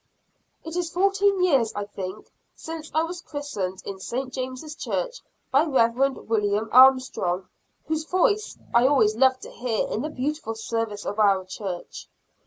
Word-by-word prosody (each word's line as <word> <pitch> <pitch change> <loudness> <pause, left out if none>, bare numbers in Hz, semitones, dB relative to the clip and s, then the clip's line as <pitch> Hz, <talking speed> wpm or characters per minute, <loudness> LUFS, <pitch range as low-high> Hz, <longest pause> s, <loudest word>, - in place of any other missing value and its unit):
It 325 +1 -7
is 355 -2 -1
fourteen 395 +1 +2
years, 270 -11 +3
I 205 0 -2
think, 195 0 -7 0.2
since 320 -1 -7
I 315 - +2
was 345 +1 -5
christened 250 - -5
in 195 -1 -6
St. 255 +6 -4
James' 260 +3 -5
Church, - - -3 0.3
by 275 +3 +5
Rev. 265 -2 +2
William 210 0 +1
Armstrong, 255 -8 +5 0.4
whose 315 0 -2
voice 405 +5 +1 0.2
I 240 +2 +5
always 220 -7 +3
loved 260 +2 +3
to - - -9
hear 235 -3 -1
in 220 - -2
the 305 - -3
beautiful 290 -4 -3
service 225 -2 -3
of 205 - -3
our 195 -3 +4
church. 185 -2 -6
255 Hz, 155 wpm, -25 LUFS, 215-315 Hz, 0.4 s, by